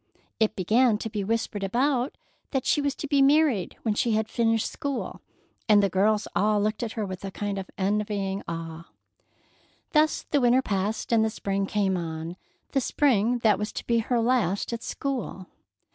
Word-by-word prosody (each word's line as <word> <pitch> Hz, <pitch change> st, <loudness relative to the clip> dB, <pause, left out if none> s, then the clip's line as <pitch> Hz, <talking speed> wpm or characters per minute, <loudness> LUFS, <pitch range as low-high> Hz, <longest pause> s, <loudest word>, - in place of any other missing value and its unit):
It 220 Hz, -1 st, +2 dB
began 220 Hz, +4 st, +3 dB
to 220 Hz, +1 st, -5 dB
be 210 Hz, -2 st, -2 dB
whispered 220 Hz, -1 st, -2 dB
about 250 Hz, +5 st, 0 dB, 0.3 s
that 265 Hz, -3 st, -1 dB
she 295 Hz, -, +2 dB
was 285 Hz, -1 st, -1 dB
to 295 Hz, -, -5 dB
be 285 Hz, -1 st, +3 dB
married 275 Hz, -, +3 dB
when 220 Hz, -, +1 dB
she 225 Hz, +2 st, +1 dB
had 220 Hz, 0 st, +1 dB
finished 225 Hz, -1 st, +1 dB
school, 280 Hz, -3 st, -4 dB, 0.5 s
and 205 Hz, -1 st, +6 dB
the 195 Hz, -, +1 dB
girls 210 Hz, +3 st, +2 dB
all 210 Hz, +1 st, +3 dB
looked 215 Hz, +1 st, -1 dB
at 230 Hz, -2 st, -3 dB
her 220 Hz, -3 st, -2 dB
with 185 Hz, -1 st, -7 dB
a 195 Hz, -, -3 dB
kind 200 Hz, 0 st, -3 dB
of 190 Hz, -, -7 dB
envying 200 Hz, 0 st, -1 dB
awe. 165 Hz, 0 st, -6 dB, 1.0 s
Thus 310 Hz, 0 st, +3 dB
the 285 Hz, -, 0 dB
winter 250 Hz, +2 st, +4 dB
passed 205 Hz, +2 st, -2 dB
and 225 Hz, -1 st, +4 dB
the 220 Hz, -, +1 dB
spring 195 Hz, -2 st, -2 dB
came 195 Hz, -3 st, +1 dB
on, 165 Hz, 0 st, -5 dB, 0.4 s
the 270 Hz, -, +1 dB
spring 245 Hz, -4 st, +2 dB
that 210 Hz, -4 st, +4 dB
was 210 Hz, +1 st, -3 dB
to -, -, -6 dB
be 235 Hz, -1 st, +2 dB
her 235 Hz, +2 st, 0 dB
last 230 Hz, -4 st, +1 dB
at 230 Hz, -, -4 dB
school. 245 Hz, -11 st, -4 dB
215 Hz, 185 wpm, -26 LUFS, 195-245 Hz, 1.0 s, and